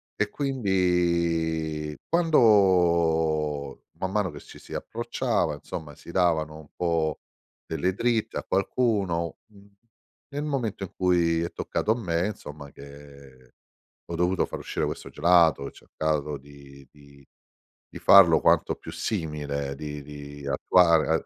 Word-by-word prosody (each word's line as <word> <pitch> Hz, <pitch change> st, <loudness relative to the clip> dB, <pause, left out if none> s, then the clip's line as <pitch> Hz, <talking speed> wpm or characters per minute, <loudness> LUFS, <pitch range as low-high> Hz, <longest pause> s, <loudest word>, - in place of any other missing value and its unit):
e 105 Hz, -, 0 dB
quindi 85 Hz, -, 0 dB
quando, 85 Hz, -, +3 dB, 0.2 s
man 95 Hz, 0 st, -2 dB
mano 105 Hz, -3 st, 0 dB
che 75 Hz, -, -10 dB
ci -, -, -14 dB
si -, -, -12 dB
approcciava, 115 Hz, -, -1 dB
insomma, 75 Hz, +1 st, -8 dB
si 85 Hz, -, -12 dB
davano 80 Hz, -4 st, +1 dB
un 75 Hz, -, -15 dB
po' 80 Hz, -3 st, 0 dB, 0.5 s
delle 85 Hz, +4 st, -1 dB
dritte 115 Hz, +1 st, 0 dB
a -, -, -3 dB
qualcuno, 95 Hz, -6 st, 0 dB, 0.2 s
n 100 Hz, 0 st, -18 dB, 0.6 s
nel 145 Hz, +1 st, -2 dB
momento 125 Hz, -9 st, -2 dB
in 95 Hz, -, -8 dB
cui 85 Hz, -3 st, +2 dB
è 85 Hz, -, -4 dB
toccato 110 Hz, -, -1 dB
a -, -, +3 dB
me, 85 Hz, -2 st, 0 dB
insomma 75 Hz, -8 st, -8 dB
che 70 Hz, -2 st, -15 dB, 0.5 s
ho 85 Hz, -, -5 dB
dovuto 90 Hz, +2 st, +1 dB
far -, -, -7 dB
uscire -, -, -3 dB
questo -, -, -5 dB
gelato, 85 Hz, -5 st, +4 dB
ho -, -, -6 dB
cercato 75 Hz, -2 st, -3 dB
di 70 Hz, -1 st, -15 dB
di 70 Hz, -1 st, -19 dB, 0.6 s
di -, -, -10 dB
farlo 90 Hz, -5 st, +7 dB
quanto -, -, +3 dB
più -, -, -10 dB
simile, 75 Hz, -7 st, -3 dB
di 75 Hz, 0 st, -7 dB
di 70 Hz, 0 st, -9 dB
attuare 80 Hz, +2 st, +3 dB
85 Hz, 135 wpm, -26 LUFS, 75-95 Hz, 0.6 s, farlo